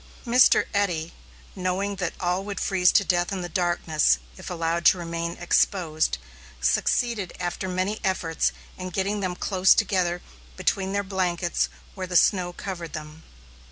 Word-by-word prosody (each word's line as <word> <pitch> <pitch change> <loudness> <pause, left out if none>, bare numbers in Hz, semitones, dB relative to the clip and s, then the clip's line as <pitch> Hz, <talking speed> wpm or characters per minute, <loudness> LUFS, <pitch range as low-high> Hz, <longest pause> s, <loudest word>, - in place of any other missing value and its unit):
Mr. 245 +2 +5
Eddy, 175 -5 0 0.4
knowing 190 +2 -1
that 180 -3 -2
all 180 +1 0
would 200 -1 -5
freeze 180 -3 +3
to 200 - +4
death 175 -1 +1
in 190 -2 -2
the 175 - -4
darkness 175 - +2 0.2
if - - -9
allowed 170 0 -1
to 185 - +6
remain 170 0 -3
exposed, 165 - +1 0.4
succeeded 205 - +1
after 180 +1 -3
many 185 +4 -1
efforts 170 -4 0 0.3
in 185 0 -4
getting 195 +3 -1
them 185 -2 -2
close 190 0 +4
together 180 -4 +1 0.3
between 190 -1 0
their 200 0 0
blankets 180 -3 0 0.2
where 185 -2 -5
the 180 - -5
snow 180 0 +4
covered 175 -2 -6
them. 155 +1 -8
180 Hz, 150 wpm, -25 LUFS, 170-195 Hz, 0.4 s, to